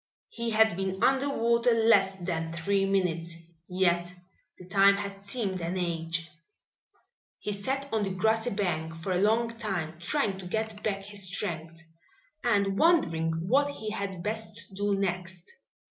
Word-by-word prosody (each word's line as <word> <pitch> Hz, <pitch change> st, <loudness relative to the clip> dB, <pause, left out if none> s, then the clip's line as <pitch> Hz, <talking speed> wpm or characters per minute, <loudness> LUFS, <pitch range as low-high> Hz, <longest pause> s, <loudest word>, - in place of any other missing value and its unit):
He 235 Hz, 0 st, -3 dB
had 220 Hz, -3 st, +4 dB
been 190 Hz, +2 st, -2 dB
under 270 Hz, +2 st, +3 dB
water 235 Hz, -2 st, +3 dB
less 205 Hz, -4 st, +4 dB
than 170 Hz, -3 st, -3 dB
three 195 Hz, +4 st, +1 dB
minutes, 170 Hz, -4 st, 0 dB, 0.3 s
yet 175 Hz, -1 st, +1 dB, 0.5 s
the 180 Hz, -, -12 dB
time 195 Hz, +1 st, +5 dB
had 200 Hz, -1 st, -6 dB
seemed 200 Hz, -5 st, -1 dB
an 170 Hz, +3 st, -2 dB
age. 165 Hz, -1 st, -2 dB, 1.1 s
He 210 Hz, -, -4 dB
sat 265 Hz, +8 st, -2 dB
on 220 Hz, -, +2 dB
the 200 Hz, -, 0 dB
grassy 220 Hz, +5 st, +1 dB
bank 170 Hz, -6 st, -2 dB
for 165 Hz, +3 st, -4 dB
a 180 Hz, 0 st, +1 dB
long 230 Hz, +3 st, +2 dB
time, 175 Hz, -7 st, -3 dB
trying 195 Hz, -, 0 dB
to 185 Hz, -, -7 dB
get 220 Hz, +1 st, -3 dB
back 195 Hz, -2 st, -2 dB
his 200 Hz, -1 st, -5 dB
strength 170 Hz, -4 st, -3 dB, 0.6 s
and 200 Hz, -4 st, +2 dB
wondering 165 Hz, -, +2 dB
what 280 Hz, +6 st, +3 dB
he 220 Hz, -7 st, -5 dB
had 195 Hz, -4 st, -4 dB
best 220 Hz, -1 st, -4 dB
do 200 Hz, +1 st, 0 dB
next. 180 Hz, -2 st, -2 dB
195 Hz, 150 wpm, -29 LUFS, 175-220 Hz, 1.1 s, time